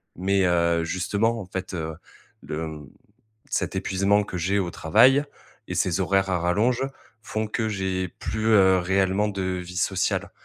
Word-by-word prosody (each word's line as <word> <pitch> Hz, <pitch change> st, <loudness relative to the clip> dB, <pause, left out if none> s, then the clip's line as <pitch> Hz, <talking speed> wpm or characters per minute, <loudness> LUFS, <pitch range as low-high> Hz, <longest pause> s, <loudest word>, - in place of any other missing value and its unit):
Mais 95 Hz, +2 st, +1 dB
heu, 85 Hz, -1 st, +2 dB
justement, 100 Hz, +7 st, 0 dB
en -, -, -7 dB
fait, 95 Hz, 0 st, -5 dB
heu, 80 Hz, -1 st, -4 dB, 0.5 s
le, 80 Hz, +1 st, -4 dB
mmh, 75 Hz, -3 st, -9 dB, 0.6 s
cet 95 Hz, 0 st, -1 dB
épuisement 100 Hz, +2 st, +2 dB
que 90 Hz, -, -6 dB
j'ai 95 Hz, +4 st, +1 dB
au 90 Hz, -3 st, -1 dB
travail 125 Hz, -, +4 dB, 0.4 s
et -, -, -3 dB
ces -, -, 0 dB
horaires 95 Hz, 0 st, +2 dB
à 90 Hz, -, +1 dB
rallonge 110 Hz, +9 st, +1 dB, 0.4 s
font 110 Hz, -1 st, -3 dB
que 110 Hz, +1 st, -2 dB
j'ai 95 Hz, -2 st, -2 dB
plus, 110 Hz, +5 st, -3 dB
heu, 95 Hz, -4 st, +5 dB
réellement 95 Hz, +3 st, +1 dB
de 100 Hz, -2 st, -3 dB
vie 90 Hz, -1 st, -4 dB
sociale. -, -, 0 dB
95 Hz, 160 wpm, -25 LUFS, 90-105 Hz, 0.6 s, heu